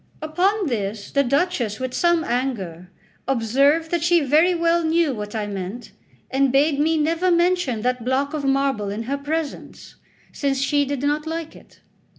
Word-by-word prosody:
Upon 365 +7 0
this 210 -6 -3
the 280 - +3
Duchess, 275 - 0
with 255 -1 -4
some 345 -1 +2
anger, 200 - -3 0.4
observed 275 +6 +2
that 345 -2 0
she 345 0 +4
very 310 +6 +3
well 335 0 +2
knew 320 -2 +2
what 210 -1 -6
I 215 -1 -1
meant, 200 +3 -6 0.4
and 270 0 +2
bade 280 +2 +2
me 320 +2 +2
never 330 +4 +1
mention 345 -9 +1
that 250 -1 -1
block 265 +4 0
of 300 -2 -3
marble 270 -6 0
in 210 +3 -4
her 275 +4 -3
presence, 305 +1 -5 0.3
since 275 -2 -1
she 285 +1 +1
did 280 -1 -4
not 300 +2 0
like 325 0 -5
it. - - -18
280 Hz, 165 wpm, -22 LUFS, 245-325 Hz, 0.4 s, she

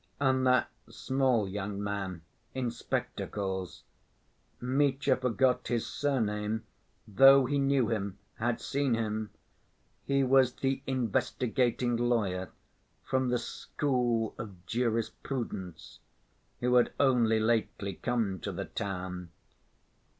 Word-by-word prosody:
And 130 -2 +2
that 125 0 +4 0.2
small 130 -6 +1
young 100 +1 -4
man 95 -4 -4 0.3
in 125 -3 -1
spectacles.... 95 -5 -4 0.8
Mitya 135 +1 +2
forgot 125 0 +1
his 120 -2 0
surname 110 -5 -1 0.4
though 135 +5 +7
he 140 +2 0
knew 135 -4 +2
him, 100 -3 -2 0.2
had 120 +1 0
seen 140 -3 0
him: 110 -1 -2 0.7
he 140 0 +2
was 130 -1 +4
the 135 0 -1
"investigating 125 0 0
lawyer," 105 -7 0 0.5
from 130 -1 0
the 125 - +2
"school 120 -2 -1
of 95 -5 -8
jurisprudence," 115 -4 -3 0.6
who 125 0 +2
had 120 - +3
only 120 -5 +4
lately 110 -3 0
come 110 -2 -1
to - - -4
the - - -4
town. 90 -2 -5
120 Hz, 105 wpm, -30 LUFS, 105-130 Hz, 0.8 s, though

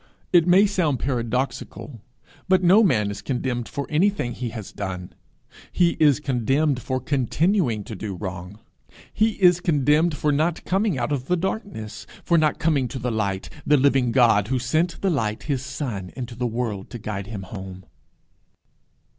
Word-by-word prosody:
It 175 -1 +5
may 185 +3 +6
sound 175 - 0
paradoxical, 125 -1 -3 0.5
but 185 -1 +4
no 190 +5 +6
man 105 - +2
is 100 0 -7
condemned 125 -2 -2
for 140 -1 -4
anything 170 -4 +1
he 120 0 -4
has 110 -3 -8
done; 90 -2 -6 0.6
he 175 -2 +3
is 145 -3 +5
condemned 135 0 0
for 130 +3 -2
continuing 135 - 0
to 110 - -8
do 100 0 -5
wrong. 90 0 -7 0.6
He 220 +1 +2
is 180 -3 +4
condemned 150 -1 +2
for 150 +1 +1
not 155 +4 0
coming 195 -3 +1
out 120 +2 -2
of 135 -2 -2
the 180 - +2
darkness, 165 - -5 0.2
for 170 -1 +3
not 155 -2 +2
coming 145 -6 +1
to 125 - -6
the 125 -1 -2
light, 100 -4 -2 0.2
the 150 - +4
living 135 -3 +3
God, 115 -5 +4
who 130 +2 0
sent 155 +8 0
the 195 - +1
light, 110 -8 -1
his 140 -4 -1
son, 125 -9 -5
into 125 -2 -6
the 120 +1 -2
world 115 -4 -3
to 120 - -7
guide 105 -3 -5
him 105 -3 -6
home. 95 -1 -9
130 Hz, 170 wpm, -23 LUFS, 110-160 Hz, 0.6 s, may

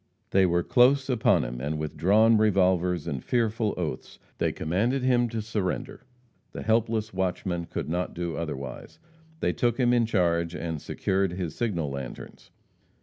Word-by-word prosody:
They 95 -1 +4
were 85 0 +1
close 130 +5 +4
upon 120 -3 +3
him, - - -5
and 75 +3 -2
with 75 0 -4
drawn 105 +8 +4
revolvers 90 -5 +2
and 70 -3 -4
fearful 115 -2 0
oaths 80 -7 -4 0.2
they - - +1
commanded 110 +12 -1
him 120 -2 +3
to 110 -1 -3
surrender. 105 -4 -3 0.5
The - - -6
helpless 110 -1 0
watchman 90 -2 -2
could - - -4
not 90 +3 -2
do 85 -1 -3
otherwise. 70 -5 -6 0.4
They - - +1
took 120 -1 0
him 120 -1 +3
in 120 -2 +3
charge 85 -5 +1
and 80 -3 -4
secured 95 -2 -1
his 90 -4 -4
signal 85 -11 -2
lanterns. 70 -3 -8
95 Hz, 155 wpm, -27 LUFS, 85-115 Hz, 0.5 s, They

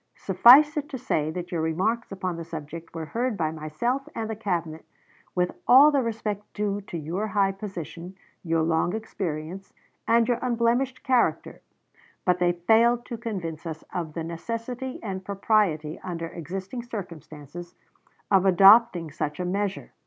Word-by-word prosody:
Suffice 255 - +6
it 295 0 -2
to 270 - -5
say 155 - -1
that 175 +2 -6
your 170 -2 -1
remarks 190 +10 -1
upon 185 -2 -3
the 165 - -6
subject 165 +1 -8
were 160 -1 -4
heard 235 +5 -2
by 155 -3 0
myself 235 - -3
and 225 -1 -3
the 220 - -4
Cabinet, 170 -7 -3 0.5
with 180 -1 +1 0.2
all 275 +5 +8
the 280 -2 +2
respect 215 -3 -3
due 205 -1 -1
to 170 - -5
your 170 +7 -3
high 195 -1 +2
position, 185 -2 -8 0.3
your 165 -2 +1
long 165 +4 +1
experience, 185 -4 -5 0.3
and 230 0 +4
your 245 -2 +1
unblemished 245 +2 0
character; 255 -3 +1 0.6
but 180 -1 +2
they 175 -1 +3
failed 230 +7 +3
to 235 - -5
convince 175 -8 -5
us 160 -1 -6
of 165 -4 -4
the 165 - -3
necessity 230 +9 -5
and 190 -3 -4
propriety, 190 -6 0
under 165 -3 -5
existing 190 - -6
circumstances, 175 - -9 0.6
of 195 -2 +5
adopting 195 -3 +6
such 150 +1 -4
a 180 - -2
measure. 195 +2 -2
190 Hz, 155 wpm, -26 LUFS, 165-230 Hz, 0.6 s, all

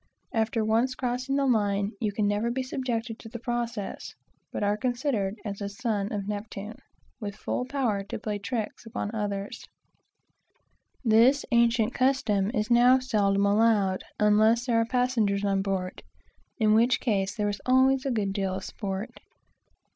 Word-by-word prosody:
After 225 0 0
once 230 +4 +1
crossing 255 -1 -2
the 280 0 +2
line 205 -4 +1
you 215 -2 0
can 205 0 0
never 205 +3 0
be 260 +2 -2
subjected 240 -3 -3
to 225 - -10
the 235 - -6
process, 235 -3 -4 0.4
but - - -3
are 205 0 +2
considered 240 -3 -1
as 200 -1 -5
a 200 - -3
son 210 -2 -2
of 200 -2 -3
Neptune, 210 +1 -6 0.4
with 205 -3 -5
full 250 - -3
powers 235 -8 -1
to - - -3
play 210 -1 -4
tricks 215 +1 -4
upon 225 -1 -4
others. 205 -2 -4 1.4
This 235 +5 +5
ancient 235 -2 +3
custom 245 -7 +1
is 215 -2 -2
now 245 +2 +6
seldom 205 -6 +1
allowed, 205 -2 +2 0.2
unless 215 +3 +4
there 230 -3 +2
are - - +1
passengers 230 -5 +1
on 195 -1 +1
board, 190 -2 -3 0.6
in 215 -2 +3
which 235 +3 +4
case 200 -4 0
there 210 -2 0
is 205 - -4
always 260 +1 +4
a 275 - -1
good 210 -5 -1
deal 195 -2 -1
of 190 - -5
sport. 195 +1 -5
220 Hz, 160 wpm, -27 LUFS, 205-245 Hz, 1.4 s, now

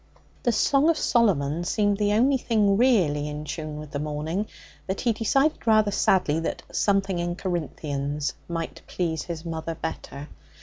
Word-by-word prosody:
The 240 - +2
Song 280 +6 +3
of 330 - +3
Solomon 170 - +2
seemed 205 +2 +1
the 205 0 +2
only 260 +6 +4
thing 210 -5 +2
really 180 - +3
in 150 +1 -6
tune 155 0 -5
with 150 -1 -8
the 145 - -3
morning, 155 +7 -2 0.4
but 190 0 -2
he 235 -2 +2
decided 270 +6 +1
rather 215 -2 +4
sadly 180 -6 +2
that 165 - -3
'something 195 -3 +1
in 175 0 -2
Corinthians' 150 -5 -3
might 165 -1 -4
please 160 -4 -2
his 170 -1 -6
mother 165 0 -4
better. 150 -3 -6
175 Hz, 160 wpm, -25 LUFS, 150-215 Hz, 0.4 s, only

